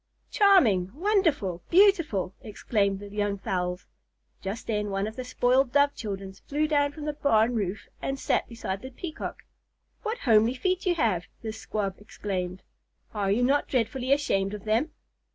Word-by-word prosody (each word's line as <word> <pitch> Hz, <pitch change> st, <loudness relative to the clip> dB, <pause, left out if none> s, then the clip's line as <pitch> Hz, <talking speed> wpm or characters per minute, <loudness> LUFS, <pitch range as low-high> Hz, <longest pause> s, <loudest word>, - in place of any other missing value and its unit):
"Charming!" 255 Hz, -, +5 dB
"Wonderful!" 315 Hz, -, +1 dB
"Beautiful!" 335 Hz, -, +4 dB
exclaimed 200 Hz, -2 st, 0 dB
the 205 Hz, -, -8 dB
young 205 Hz, 0 st, -1 dB
fowls. 180 Hz, -1 st, -2 dB, 0.6 s
Just 200 Hz, +4 st, -5 dB
then 210 Hz, -2 st, -1 dB
one 195 Hz, 0 st, -1 dB
of 220 Hz, +1 st, -6 dB
the 255 Hz, -, -4 dB
spoiled 250 Hz, +1 st, +2 dB
Dove 285 Hz, 0 st, +4 dB
children 195 Hz, -3 st, -5 dB
flew 295 Hz, +9 st, -2 dB
down 290 Hz, -2 st, +2 dB
from 295 Hz, 0 st, -8 dB
the 300 Hz, -, -1 dB
barn 235 Hz, -5 st, +3 dB
roof 205 Hz, -3 st, -2 dB
and 270 Hz, -, -2 dB
sat -, -, 0 dB
beside 200 Hz, -5 st, -4 dB
the 260 Hz, -, -7 dB
Peacock. 315 Hz, +5 st, -6 dB, 0.6 s
"What 445 Hz, +1 st, -2 dB
homely 225 Hz, -, +4 dB
feet 370 Hz, +7 st, -1 dB
you 350 Hz, -, +3 dB
have!" 205 Hz, -, +1 dB, 0.2 s
this 220 Hz, -1 st, -5 dB
Squab 200 Hz, -3 st, -3 dB
exclaimed. 185 Hz, -3 st, -4 dB, 0.5 s
"Are 205 Hz, -2 st, -1 dB
you 220 Hz, +5 st, +2 dB
not 280 Hz, +3 st, +2 dB
dreadfully 255 Hz, +1 st, -1 dB
ashamed 205 Hz, -9 st, +1 dB
of 210 Hz, -, -10 dB
them?" 225 Hz, +9 st, +1 dB
225 Hz, 160 wpm, -27 LUFS, 200-285 Hz, 0.6 s, Charming